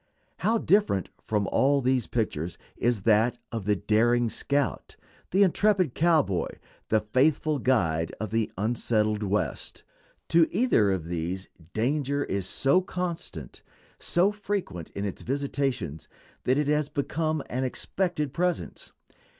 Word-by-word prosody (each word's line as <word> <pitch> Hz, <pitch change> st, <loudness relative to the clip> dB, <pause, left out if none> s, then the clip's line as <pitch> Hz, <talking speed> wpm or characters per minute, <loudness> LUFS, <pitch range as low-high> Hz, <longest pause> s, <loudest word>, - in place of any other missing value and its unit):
How 225 Hz, +2 st, +2 dB
different 200 Hz, -, +2 dB
from 105 Hz, -2 st, -1 dB
all 140 Hz, +1 st, +3 dB
these 130 Hz, -1 st, +1 dB
pictures 90 Hz, -8 st, -2 dB, 0.2 s
is 120 Hz, -5 st, 0 dB
that 115 Hz, +3 st, +3 dB
of 115 Hz, -4 st, -4 dB
the 105 Hz, 0 st, +3 dB
daring 115 Hz, +4 st, +2 dB
scout, 140 Hz, -1 st, -1 dB, 0.3 s
the 195 Hz, +3 st, +4 dB
intrepid 190 Hz, -, +2 dB
cowboy, 155 Hz, -, +2 dB, 0.4 s
the 110 Hz, -1 st, +3 dB
faithful 145 Hz, +6 st, +2 dB
guide, 85 Hz, -11 st, +1 dB
of 105 Hz, -1 st, -4 dB
the 115 Hz, -1 st, 0 dB
unsettled 110 Hz, 0 st, 0 dB
West. 100 Hz, -5 st, -2 dB, 0.5 s
To 165 Hz, 0 st, +5 dB
either 190 Hz, -, +3 dB
of 90 Hz, -4 st, -2 dB
these 85 Hz, +3 st, -3 dB, 0.3 s
danger 140 Hz, +4 st, 0 dB
is 95 Hz, -6 st, -2 dB
so 140 Hz, +7 st, +3 dB
constant, 170 Hz, -, -5 dB, 0.4 s
so 180 Hz, +4 st, +2 dB
frequent 195 Hz, -, -4 dB
in 100 Hz, -, -2 dB
its 100 Hz, -, -4 dB
visitations, 135 Hz, -, -2 dB, 0.4 s
that 130 Hz, +2 st, +3 dB
it 150 Hz, -1 st, +1 dB
has 150 Hz, 0 st, +1 dB
become 155 Hz, +1 st, -1 dB
an 130 Hz, +2 st, -2 dB
expected 150 Hz, +2 st, -2 dB
presence. 175 Hz, -, -2 dB
125 Hz, 130 wpm, -27 LUFS, 105-155 Hz, 0.5 s, To